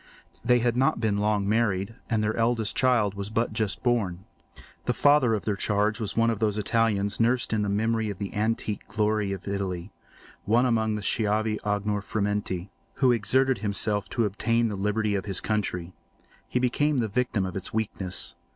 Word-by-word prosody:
They 125 - +4
had 120 0 +1
not 130 0 +2
been 105 -3 0
long 105 -1 +1
married, 105 -2 +1 0.2
and 110 -3 +1
their 105 +1 0
eldest 115 -1 0
child 120 -6 +3
was 100 0 -5
but 115 +1 -1
just 110 -2 -2
born. 100 -8 0 0.6
The - - 0
father 145 -6 +4
of 105 - -5
their 105 - 0
charge 105 +2 +1
was 110 -2 -4
one 115 0 +4
of 110 - -3
those 105 -2 +1
Italians 105 -2 +1
nursed 120 0 +2
in 110 - +1
the 105 - -1
memory 110 +2 0
of 100 - -5
the 100 -1 -5
antique 110 -1 -2
glory 105 -2 0
of 95 -1 -6
Italy—one 100 +4 -3
among 110 -3 +1
the 105 - -5
schiavi 105 +1 0
ognor 105 0 -1
frementi, 100 -3 -2 0.3
who 130 -2 +4
exerted 125 +2 +2
himself 105 -1 -1
to 115 - 0
obtain 115 +3 +1
the 105 - -3
liberty 105 +2 0
of 100 -2 -2
his 95 -3 0
country. 95 -5 -2 0.6
He - - -1
became 135 +4 +1
the 115 -3 +1
victim 110 -2 0
of 95 - -5
its 95 - -3
weakness. 100 -4 -3
105 Hz, 180 wpm, -26 LUFS, 100-115 Hz, 0.6 s, They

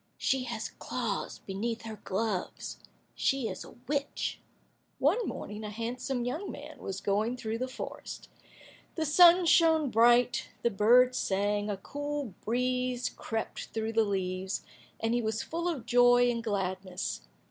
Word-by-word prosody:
She 260 -1 +1
has 235 -2 -4
claws - - -3
beneath 225 +4 -3
her 220 -2 -8
gloves; 195 -1 -2 0.3
she 270 -4 +1
is - - -5
a - - -13
witch." 285 0 -2 0.6
One 375 - +2
morning, 210 +1 -5
a 210 - -4
handsome 240 +3 -3
young 310 +11 -3
man - - -9
was 195 0 -4
going 215 +5 0
through 225 -1 -3
the 255 - -1
forest. 255 - -7 0.7
The 320 - 0
sun 345 +4 +7
shone 320 -4 +5
bright, 240 +2 +4
the 235 - +3
birds 245 +5 +5
sang, 205 +2 0
a 205 - -2
cool 290 +1 -4
breeze 250 +1 0
crept 225 -1 -4
through 225 0 -1
the 225 0 +4
leaves, 190 -1 -2 0.4
and 225 +1 0
he 240 - +2
was 220 -1 -1
full 340 +2 -3
of 310 -9 -2
joy 245 0 +5
and 235 -1 -3
gladness. 185 - -2
235 Hz, 145 wpm, -30 LUFS, 210-255 Hz, 0.7 s, sun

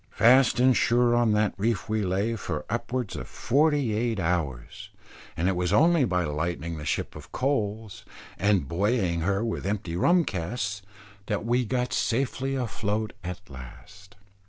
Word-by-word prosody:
Fast 125 +1 +4
and 130 0 +5
sure 120 0 +3
on 120 -2 +3
that 105 0 +2
reef 115 +3 0
we 110 0 0
lay 100 +5 0
for 80 -8 -4
upwards 120 0 -2
of - - -6
forty 145 -3 +1
eight 115 0 -1
hours, 80 -8 -3 0.5
and 85 - +1
it 95 - +1
was 90 -1 -1
only 165 -2 +4
by 90 -5 0
lightening 85 +1 -3
the 75 - -7
ship - - -2
of - - -11
coals, 110 -6 -2 0.4
and 95 -5 +2
buoying 95 - 0
her 100 +6 0
with 115 - -3
empty 100 -5 -3
rum 170 - +3
casks 100 +3 -3 0.5
that 105 +1 -2
we 120 +1 +1
got 125 +2 -1
safely 135 +2 -1
afloat 110 -3 -2
at 90 +2 -7
last. 80 +10 -13
105 Hz, 155 wpm, -26 LUFS, 90-120 Hz, 0.5 s, and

